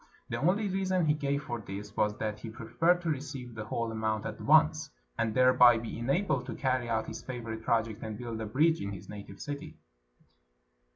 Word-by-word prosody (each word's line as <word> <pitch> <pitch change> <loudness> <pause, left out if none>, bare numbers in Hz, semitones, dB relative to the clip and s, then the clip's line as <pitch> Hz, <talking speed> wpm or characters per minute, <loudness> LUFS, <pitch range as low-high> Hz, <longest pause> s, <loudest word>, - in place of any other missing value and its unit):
The 115 - -2
only 195 +7 +2
reason 185 -2 +1
he 150 - +4
gave 140 -1 -1
for 120 -1 -4
this 100 0 -7
was 105 0 +1
that 105 -1 -3
he 115 - -7
preferred 165 +10 +1
to 170 - -2
receive 135 -4 -5
the 110 -1 -6
whole 115 -1 -2
amount 110 -1 -1
at - - -5
once, 155 0 +4 0.3
and 115 -1 -1
thereby 125 -2 +7
be 115 0 -5
enabled 135 0 0
to - - -4
carry 130 -3 0
out 110 -1 0
his - - -7
favorite 115 -3 -5
project 115 -2 0
and 110 -1 -5
build 115 -2 -5
a 110 - -3
bridge 160 +9 +3
in 100 0 -3
his 95 0 -9
native 100 -1 -9
city. 145 +2 -6
120 Hz, 195 wpm, -30 LUFS, 110-150 Hz, 0.3 s, thereby